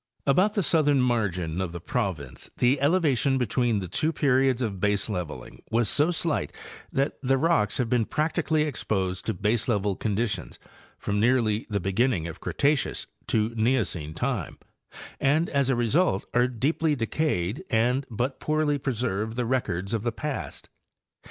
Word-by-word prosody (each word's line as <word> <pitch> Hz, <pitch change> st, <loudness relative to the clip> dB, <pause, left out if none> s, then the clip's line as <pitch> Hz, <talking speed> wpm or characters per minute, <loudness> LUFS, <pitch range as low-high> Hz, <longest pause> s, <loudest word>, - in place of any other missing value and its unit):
About 185 Hz, +10 st, +3 dB
the 200 Hz, -, +2 dB
southern 145 Hz, -4 st, +4 dB
margin 95 Hz, -9 st, 0 dB
of 90 Hz, -2 st, -3 dB
the 85 Hz, -, -5 dB
province 75 Hz, -8 st, -3 dB
the 130 Hz, +3 st, +2 dB
elevation 140 Hz, -4 st, +2 dB
be 125 Hz, -, +1 dB
tween 120 Hz, 0 st, +1 dB
the 95 Hz, -2 st, -3 dB
two 155 Hz, -, 0 dB
periods 135 Hz, -4 st, +2 dB
of 105 Hz, -7 st, -2 dB
baseleveling 95 Hz, -, -2 dB
was 115 Hz, -1 st, +2 dB
so 150 Hz, +3 st, +3 dB
slight 165 Hz, -2 st, -1 dB, 0.4 s
that 135 Hz, +1 st, -1 dB
the 135 Hz, 0 st, +2 dB
rocks 135 Hz, -9 st, +2 dB
have 125 Hz, -, 0 dB
been 115 Hz, -1 st, +2 dB
practically 155 Hz, +1 st, 0 dB
exposed 95 Hz, -9 st, -2 dB
to: -, -, 0 dB
baselevel 105 Hz, -1 st, 0 dB
conditions 105 Hz, -2 st, -2 dB, 0.4 s
from 105 Hz, 0 st, -2 dB
nearly 115 Hz, -2 st, +2 dB
the 100 Hz, -2 st, 0 dB
beginning 95 Hz, 0 st, +1 dB
of 85 Hz, -, -7 dB
Cretaceous 145 Hz, -1 st, 0 dB, 0.2 s
to 110 Hz, 0 st, +1 dB
Neocene 110 Hz, -, 0 dB
time, 120 Hz, -, -2 dB, 0.6 s
and 155 Hz, +5 st, +2 dB
as 140 Hz, -2 st, +1 dB
a 130 Hz, -, +3 dB
result 120 Hz, -, +2 dB
are 125 Hz, 0 st, +4 dB
deeply 145 Hz, +6 st, 0 dB
decayed 115 Hz, -, -1 dB
and 125 Hz, +4 st, +1 dB
but 125 Hz, +4 st, -2 dB
poorly 155 Hz, -1 st, +1 dB
preserve 115 Hz, -4 st, -2 dB
the 125 Hz, 0 st, -1 dB
records 100 Hz, -6 st, -1 dB
of 115 Hz, -, 0 dB
the 120 Hz, +2 st, -1 dB
past. 145 Hz, +4 st, -5 dB
120 Hz, 150 wpm, -26 LUFS, 100-140 Hz, 0.6 s, southern